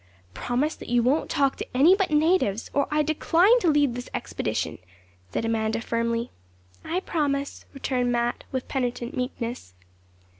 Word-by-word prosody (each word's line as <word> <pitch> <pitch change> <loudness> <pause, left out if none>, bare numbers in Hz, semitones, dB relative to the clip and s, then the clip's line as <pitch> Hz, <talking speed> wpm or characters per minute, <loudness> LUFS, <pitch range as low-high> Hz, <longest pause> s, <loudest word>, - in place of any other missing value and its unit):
'Promise 265 - -1
that - - -10
you 240 -1 +3
won't 270 +6 +1
talk 275 -1 +1
to - - -6
any 325 +8 +7
but 390 -2 0
natives, 300 - +2
or 280 -1 +2
I 300 0 +2
decline 340 - +4
to 360 - +2
lead 290 -4 +3
this 245 0 -6
expedition,' - - -3 0.5
said 225 - -1
Amanda 220 0 0
firmly. 230 +1 -1 0.5
'I 355 +3 -2
promise,' 280 -6 -2
returned 255 -3 -1
Mat, 240 0 0
with 260 -1 -3
penitent 245 -2 -2
meekness. 245 - -4
260 Hz, 150 wpm, -25 LUFS, 235-300 Hz, 0.5 s, any